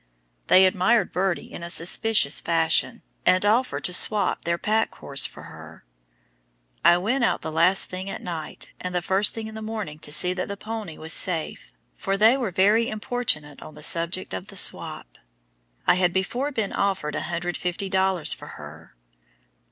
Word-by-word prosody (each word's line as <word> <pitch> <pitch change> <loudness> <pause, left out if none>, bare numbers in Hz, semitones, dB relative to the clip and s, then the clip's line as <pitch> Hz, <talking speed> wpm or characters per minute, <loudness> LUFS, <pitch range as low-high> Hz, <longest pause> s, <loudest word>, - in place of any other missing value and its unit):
They 190 +1 +7
admired 190 +5 +2
Birdie 185 0 -2
in - - -8
a 170 - -6
suspicious 175 -1 +3
fashion, 165 -1 +1 0.2
and 185 +2 +3
offered 235 +5 +1
to 180 - +1
"swop" 200 +1 +1
their 170 0 0
pack 220 +4 0
horse 140 0 0
for - - -14
her. - - -13 1.0
I 175 - +6
went 235 +8 0
out - - 0
the 160 - -4
last 175 +4 +3
thing 185 +1 -5
at - - -5
night 165 -3 -7
and 180 0 -5
the 175 - -1
first 195 +3 +2
thing 225 -1 -5
in 220 - -8
the 220 - -7
morning 215 -9 -6
to 150 - -7
see 180 +4 +1
that 185 0 -4
"the 200 - -6
powny" 215 -6 -7
was 160 +1 -1
safe, 170 -5 -2 0.2
for 195 0 -2
they 220 +5 +5
were 250 -6 -2
very 205 +6 +3
importunate 210 - -3
on 155 - -11
the 150 - -9
subject 170 - +1
of 95 - -6
the - - -9
"swop." - - +1 0.7
I - - +5
had 180 -1 +1
before 240 +10 -2
been 220 -7 -2
offered 190 -7 -1
150 175 +3 -3
dollars 190 -3 +1
for - - -11
her. 75 0 -12
185 Hz, 175 wpm, -24 LUFS, 170-215 Hz, 1.0 s, They